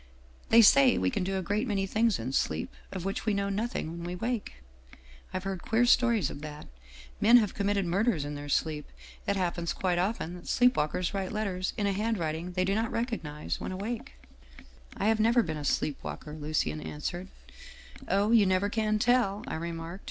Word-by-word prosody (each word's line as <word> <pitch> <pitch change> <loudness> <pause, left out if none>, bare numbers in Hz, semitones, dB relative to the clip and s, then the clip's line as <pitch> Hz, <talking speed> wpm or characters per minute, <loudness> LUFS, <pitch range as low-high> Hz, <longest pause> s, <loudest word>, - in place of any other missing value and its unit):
They 230 0 +8
say 260 +4 +6
we 90 0 +1
can - - -1
do 190 +1 -1
a 190 - -2
great 205 +7 -1
many 195 -3 0
things 220 +2 +2
in 125 +4 -4
sleep, 80 -10 -1 0.2
of 185 -2 -5
which 195 +3 -3
we 210 - +2
know 200 0 0
nothing 205 -5 -2
when 170 0 -7
we 175 +1 -4
wake. 230 - -3 0.8
I've 185 0 -3
heard 195 -2 -4
queer 230 +2 +2
stories 240 -4 +3
of 145 - -8
that. 150 0 -8 0.5
Men 230 +4 +7
have 215 -5 +2
committed 200 -1 0
murders 180 -2 +1
in 145 - -4
their 145 0 -7
sleep. 150 0 0 0.4
It 200 - +2
happens 175 -2 -1
quite 180 -2 0
often 185 -2 -1
that 180 -1 -10
sleep 250 0 +4
walkers 160 +5 -1
write 195 -2 -2
letters 195 -4 -2
in 210 - 0
a 200 - +1
handwriting 180 -5 -2
they 185 0 +1
do 195 - +1
not 225 +2 0
recognize 215 - -3
when - - -4
awake/ 230 +8 -5 0.3
" - - -19
' - - -26
I - - -1
have 220 0 +3
never 230 +2 +4
been 160 -5 -3
a 150 - -5
sleep 145 0 -1
walker/ 150 - -6
answered 155 0 -8
Lucien. 80 - -3 0.2
" - - -16
' - - -16
Oh, 205 +2 +2
you 220 -4 +6
never 190 +2 +2
can 215 -1 +1
tell/ 220 -3 +2
I 275 - -5
remarked. 165 +2 -5
195 Hz, 210 wpm, -29 LUFS, 170-220 Hz, 0.8 s, They